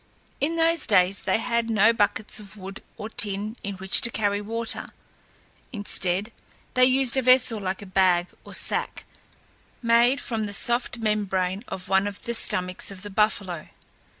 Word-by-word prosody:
In 315 +4 -1
those 330 -1 +1
days 190 -2 +3
they - - 0
had 235 0 -2
no 220 +1 +4
buckets 210 -1 -1
of 210 0 -13
wood 195 0 -9 0.2
or 215 - -6
tin 210 0 0
in 200 -1 -5
which 190 +1 +2
to 235 - +2
carry 205 -2 -1
water. 230 +2 -2 0.8
Instead, 205 -2 -1 0.4
they 255 0 +4
used 260 -1 +3
a - - +2
vessel 255 -3 +4
like 190 0 -5
a - - -10
bag 185 -2 +2 0.2
or - - -4
sack, - - +4 0.8
made 235 +3 +3
from 225 -6 -4
the 205 - -7
soft 240 +3 0
membrane 200 -3 -2
of 185 +1 -8
one 190 +1 +2
of 200 -1 -8
the 235 - -4
stomachs 185 -5 -1
of 195 -2 -8
the 205 - -8
buffalo. 190 -5 -1
210 Hz, 165 wpm, -24 LUFS, 195-235 Hz, 0.8 s, no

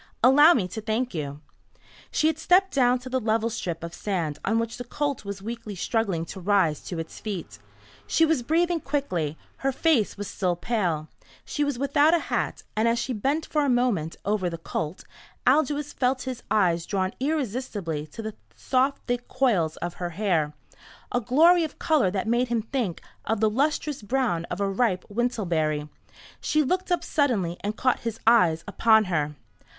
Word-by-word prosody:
Allow 290 +7 +8
me 190 -7 0
to 220 - -5
thank 225 +3 -1
you." 145 -3 -4 0.7
She - - 0
had 315 0 +2
stepped 370 +3 +3
down 250 -2 +4
to 255 - -9
the 260 0 0
level 225 0 0
strip 170 -7 -4
of 170 0 -6
sand 175 -7 -2
on 225 +3 +1
which 230 0 -2
the 245 - -5
colt 280 +1 -2
was 200 -1 -6
weakly 230 -2 -6
struggling 190 -4 -1
to 190 - -8
rise 185 -5 +2
to 175 - -5
its 165 0 -6
feet. 175 - -6 0.5
She 325 - +4
was 320 -5 +1
breathing 335 +6 +1
quickly. 185 - -2 0.2
Her 270 - 0
face 270 -7 +2
was 205 0 -4
still 180 -3 -1
pale. 175 -6 -1 0.4
She 295 - -1
was 285 -3 -1
without 285 +4 +4
a 335 - -3
hat, - - -1
and 220 +2 +2
as 230 0 +2
she 235 +2 -2
bent 275 +8 0
for 300 -1 0
a 285 - +1
moment 240 -11 +1
over 200 -3 +1
the 165 - -5
colt 160 0 -4 0.4
Aldous 295 +2 +2
felt 255 0 0
his 255 -2 -5
eyes 175 -6 +2
drawn 190 -2 -1
irresistibly 235 - -2
to 225 +9 -8
the 220 0 -4 0.2
soft 265 +2 0
thick 245 0 -2
coils 210 - +1
of 175 - -4
her 175 - -1
hair, 165 -8 +1 0.6
a 245 - +1
glory 330 +9 +5
of 310 - -5
colour 300 - +2
that 190 +2 -2
made 240 +2 +2
him 235 -2 0
think 225 -7 -3 0.2
of 225 0 0
the 215 0 +3
lustrous 290 +2 0
brown 210 -7 0
of 180 - -5
a 200 - +1
ripe 195 -2 0
wintelberry. 170 -10 0 0.5
She 305 0 +2
looked 365 +6 -1
up 350 -1 +1
suddenly 225 - 0
and 210 +2 -4
caught 255 -1 +2
his 230 -1 -4
eyes 180 -8 +4
upon 220 +1 +4
her. 150 -6 -1
225 Hz, 185 wpm, -26 LUFS, 180-265 Hz, 0.7 s, Allow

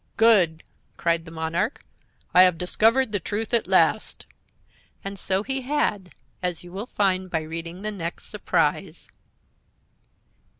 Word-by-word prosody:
"Good," 190 -8 +4 0.3
cried 170 -1 0
the - - -10
monarch; 165 - -2 0.5
"I 180 - +8
have 180 -2 +5
discovered 225 +8 +2
the 205 - 0
truth 215 +5 -4
at 235 - +3
last!" - - +2 0.8
And 195 0 -5
so 190 +1 0
he 270 +3 -2
had, 245 -9 -1 0.3
as 180 -2 -2
you 175 - -12
will 200 +6 -6
find 190 -4 0
by 160 -2 -1
reading 165 +4 -7
the 215 - -2
next 170 -4 -5
surprise. - - -1
185 Hz, 135 wpm, -24 LUFS, 170-215 Hz, 0.8 s, I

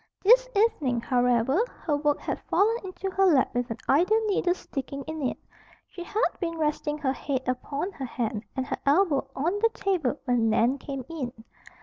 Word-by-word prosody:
This - - +6
evening, 305 - +2
however, 245 - +2 0.2
her 300 - +1
work 290 0 +1
had - - -3
fallen 440 +3 +3
into 380 0 -5
her 385 +1 +2
lap 290 -7 +3
with 245 0 -1
an 225 - -4
idle 365 +10 +4
needle 370 -4 +1
sticking 275 -4 -6
in 315 +1 -6
it. 260 - -1 0.5
She 350 - -8
had 425 +6 +1
been 335 -2 -3
resting 300 -1 -1
her 275 -3 0
head 265 -2 -3
upon 280 +8 -2
her 270 - -6
hand 230 -3 -3
and 260 - -1
her - - -3
elbow 285 -2 +2
on 340 +9 0
the 455 +2 +4
table 325 -9 0
when 240 -3 +2
Nan 240 +5 +2
came 275 -2 -6
in. 290 -7 -4
290 Hz, 185 wpm, -27 LUFS, 255-365 Hz, 0.5 s, This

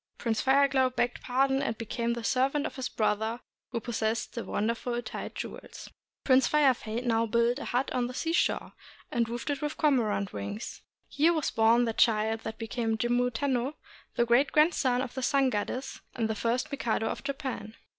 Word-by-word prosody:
Prince 225 -2 -1
Fire 275 +1 +5
Glow 265 -1 +2
begged 245 -1 -1
pardon 270 +2 +1
and 225 -5 -2
became 235 +1 -2
the 235 -1 -5
servant 270 +5 +1
of - - -5
his 260 -2 -3
brother 220 +2 0 0.3
who 240 - -2
possessed 225 0 -2
the 235 - -4
wonderful 235 +3 -1
tide - - -6
jewels. - - -8 0.3
Prince 260 -1 +5
Fire 295 -3 +4
Fade 235 +1 -5
now 230 -1 +2
built 235 +4 +2
a - - -6
hut 250 +2 -1
on 245 -1 0
the 250 - -7
seashore, 330 +5 0 0.4
and 235 -1 0
roofed 240 +4 -4
with 280 - -3
it 295 0 -3
cormorant 230 -10 +1
wings. 100 - -6 0.3
Here 320 +4 +3
was 315 -3 -1
born 230 +2 +4
the 225 - -1
child 220 -1 +2
that 220 0 -6
became 225 -1 -2
Jimmu 245 +2 +1
Tenno, 260 +3 -1 0.4
the 235 - +3
great 240 +5 +3
grandson 275 -5 +3
of 250 - -6
the 260 - -4
Sun 270 0 +2
Goddess, 250 +5 -3
and 225 -2 0
the 220 - -1
first 235 +6 -1
Mikado 235 -5 -1
of - - -3
Japan. 270 -6 -4
245 Hz, 185 wpm, -29 LUFS, 225-270 Hz, 0.4 s, Fire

